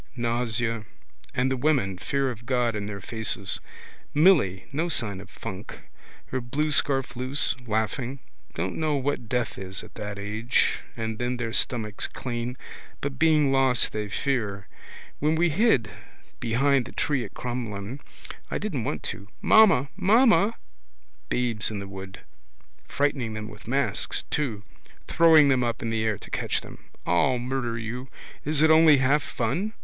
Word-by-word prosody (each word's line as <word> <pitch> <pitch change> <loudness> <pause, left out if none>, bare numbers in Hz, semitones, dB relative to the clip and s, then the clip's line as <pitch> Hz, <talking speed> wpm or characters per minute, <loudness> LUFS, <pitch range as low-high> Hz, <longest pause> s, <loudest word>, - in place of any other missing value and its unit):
Nausea. 115 -2 -1 0.5
And 130 +1 +1
the - - +2
women, 125 -10 +1
fear 135 +4 0
of 120 0 -11
God 125 -3 +1
in 100 -1 -3
their 100 -1 -6
faces. 110 -2 -1 0.6
Milly, 145 - +4
no 160 +5 -1
sign 105 - -1
of 100 - -13
funk. 105 -2 -8 0.5
Her 130 - -3
blue 150 +6 -1
scarf 135 -3 +1
loose, 130 +4 0
laughing. 110 +5 -1 0.4
Don't 90 +3 -2
know 155 -2 +1
what 135 -4 -2
death 125 0 -1
is 95 0 -6
at - - -13
that 105 -1 -6
age. 110 +4 +1 0.2
And 110 -1 -3
then 125 +1 -1
their 115 -2 -3
stomachs 110 -5 0
clean. 120 0 -4 0.4
But 135 -2 -4
being 155 -3 +4
lost 135 -2 +3
they 105 -1 -3
fear. 105 -5 -2 0.5
When 155 +2 +2
we 170 +2 +3
hid 145 - +3 0.5
behind 125 +2 +2
the - - -10
tree 140 -4 0
at 110 - -9
Crumlin. 120 -1 -4 0.5
I - - -1
didn't - - -3
want - - -3
to. 100 - -12
Mamma! 175 -11 +5
Mamma! 215 +2 +4 0.7
Babes 120 -4 0
in 110 - -4
the 100 0 -6
wood. 95 0 -9 0.7
Frightening 135 - -1
them 105 0 -5
with - - -13
masks 120 -4 0
too. 120 -9 -1 0.4
Throwing 160 -3 +6
them 130 -2 +3
up 120 0 -2
in 115 - -2
the 110 -1 0
air 110 -2 0
to - - -13
catch - - -1
them. - - -13 0.2
I'll 85 +9 +3
murder 120 -1 -2
you. 115 +3 -5 0.4
Is 150 0 +2
it 160 - +6
only 160 -2 +7
half 135 +3 +3
fun? 145 - -2
125 Hz, 155 wpm, -26 LUFS, 110-140 Hz, 0.7 s, only